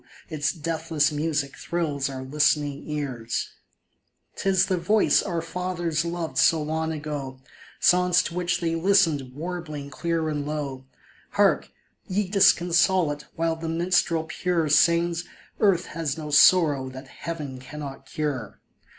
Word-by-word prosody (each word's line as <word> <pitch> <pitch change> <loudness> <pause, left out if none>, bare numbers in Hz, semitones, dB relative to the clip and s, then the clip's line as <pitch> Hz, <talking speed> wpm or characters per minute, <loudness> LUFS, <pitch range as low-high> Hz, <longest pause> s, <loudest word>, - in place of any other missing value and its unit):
its 155 -2 0
deathless 160 -2 -1
music 150 -2 -2
thrills 150 -5 -2
our 130 -1 -6
listening 145 +1 0
ears! 130 -6 -3 0.9
'Tis 195 -1 +2
the 190 - 0
voice 205 +5 +3
our 170 -4 -3
fathers 175 -2 -2
loved 170 -1 -3
so 165 - +5
long 160 +1 -2
ago, 145 -4 -5 0.4
Songs 180 0 +4
to - - -5
which 175 0 -1
they 165 -1 0
listened 165 -7 +2
warbling 155 -3 -6
clear 165 +2 -1
and 150 -2 -2
low; 145 -3 -4 0.5
Hark, - - +3 0.2
" - - -43
Ye 195 +1 0
Disconsolate! 175 -4 +3
" - - -39
while 165 0 0
the 165 0 -5
minstrel 170 -1 +1
pure 165 0 -1
Sings 170 +2 +3
— - - -24
" - - -35
Earth 190 -4 +3
has 155 -3 -2
no 150 -2 -6
sorrow 145 -3 +5
that 130 +1 -10
heaven 145 -4 -6
cannot 135 0 -8
cure 135 -9 -4
160 Hz, 140 wpm, -25 LUFS, 145-175 Hz, 0.9 s, so